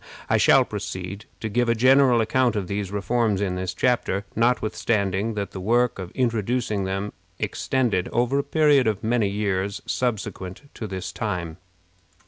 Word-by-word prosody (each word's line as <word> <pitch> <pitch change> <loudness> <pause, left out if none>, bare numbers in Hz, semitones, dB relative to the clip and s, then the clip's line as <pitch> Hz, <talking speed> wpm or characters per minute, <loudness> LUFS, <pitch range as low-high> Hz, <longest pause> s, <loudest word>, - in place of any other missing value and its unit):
I - - +5
shall - - +5
proceed 95 +3 -6 0.2
to 110 - -2
give 120 +3 +1
a 115 - +3
general 130 0 +5
account 120 +2 +2
of 100 -3 -1
these 100 +1 -3
reforms 105 0 0
in 100 -3 -1
this 90 0 -3
chapter, 105 -1 0
notwithstanding 110 -3 0
that 100 -1 -3
the 95 - -7
work 120 +4 +1
of 90 -2 -5
introducing 115 -3 0
them 95 +2 -3 0.2
extended 120 -9 0
over 125 +3 +1
a - - 0
period 145 -3 +3
of 105 -2 -1
many 110 -2 +1
years 100 -1 -1
subsequent 105 -4 -3
to 110 - -6
this 95 -2 -5
time. 85 -2 -3
110 Hz, 155 wpm, -24 LUFS, 95-120 Hz, 0.2 s, I